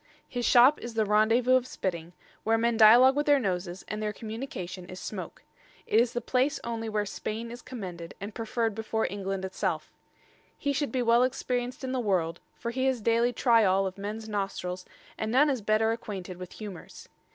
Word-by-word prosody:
His 245 -1 -2
shop 255 +5 +6
is 235 -1 -7
the 220 -1 +2
Randevous 225 +5 +4
of 255 0 -3
spitting, 170 -5 -4 0.3
where 225 +1 +3
men 235 +1 +1
dialogue 240 +4 +7
with 295 +1 0
their 290 -1 +6
noses, 180 -4 -3
and 215 0 -4
their 210 0 -1
communication 215 -6 -6
is 185 +1 -8
smoake. - - -7 0.4
It 220 - +3
is 235 0 +2
the 240 - -2
place 260 +3 +1
onely 225 -1 -3
where 210 -1 0
Spaine 220 +3 -5
is 240 +1 -8
commended, 185 -9 -7
and 205 +2 -6
prefer'd 225 0 -1
before 220 +1 -1
England 195 -1 -3
itselfe. 190 - -3 0.7
He 285 - -1
should 280 -3 -1
be 255 0 0
well 235 +1 +4
experienc'd 250 0 -1
in 260 - -3
the 260 - -1
world: 180 -7 0 0.2
for 235 - -4
he 260 +2 0
ha's 260 -2 +1
daily 230 +2 +2
tryall 220 -6 +3
of 190 +1 -5
mens 215 +2 -5
nostrils, 195 -3 -3 0.3
and 220 0 -2
none 285 +4 +5
is 255 -4 -2
better 215 +2 +2
acquainted 195 -5 -5
with 180 -1 -9
humors. 205 -5 -9
225 Hz, 190 wpm, -28 LUFS, 195-245 Hz, 0.7 s, dialogue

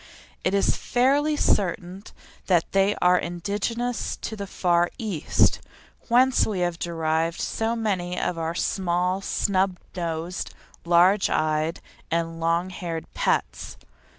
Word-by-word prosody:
It 185 - +1
is 200 - +2
fairly 285 +5 +2
certain 185 -3 0 0.5
that 175 -3 +2
they 195 +1 +3
are 180 0 +5
indigenous 210 +7 -2
to 220 - -4
the 200 -2 -6
Far 175 -2 +2
East, 210 - +1 0.5
whence 255 +2 +4
we 200 -4 -2
have 175 -1 -1
derived 165 0 -1
so 225 +1 -1
many 185 -6 -1
of 180 - -1
our 165 0 -3
small 180 0 0
snub 190 -1 0 0.2
nosed, 170 0 -4 0.3
large 180 +4 +4
eyed, 155 +1 0 0.3
and 165 0 -1
long 170 +3 0
haired 170 -3 -6
pets. - - -1
180 Hz, 125 wpm, -25 LUFS, 170-205 Hz, 0.5 s, are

